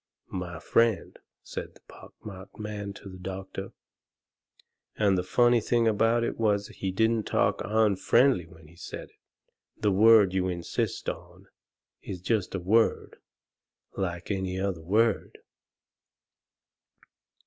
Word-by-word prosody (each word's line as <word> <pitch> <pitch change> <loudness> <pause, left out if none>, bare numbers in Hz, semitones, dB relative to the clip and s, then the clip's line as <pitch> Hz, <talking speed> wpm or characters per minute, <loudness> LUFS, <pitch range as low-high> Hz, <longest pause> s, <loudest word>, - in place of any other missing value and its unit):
"My 90 -2 -4
friend," 115 +2 +1 0.2
said - - -7
the - - -20
pock - - -15
marked 95 -2 -10
man 105 -1 -5
to 100 - -12
the 95 -1 -10
doctor 95 +1 -6 1.3
and 100 -3 +3
the 90 - +1
funny 120 +5 +3
thing 115 +1 +2
about 115 +2 +3
it 115 - -3
was 105 -2 +1
he 95 - -4
didn't 110 +2 +1
talk - - +1
unfriendly 110 0 +3
when 80 -1 -16
he 85 - -18
said 85 - -8
it - - -33 0.6
"the 105 - +1
word 105 -1 +6
you 95 -1 +1
insist 85 -2 -3
on - - -7 0.6
is 90 - -6
just 100 +1 -1
a - - -1
WORD, 110 +6 +1 0.8
like 85 -1 -3
any 95 -1 -2
other 95 -4 -2
word." 105 +5 +1
100 Hz, 130 wpm, -28 LUFS, 95-110 Hz, 1.3 s, word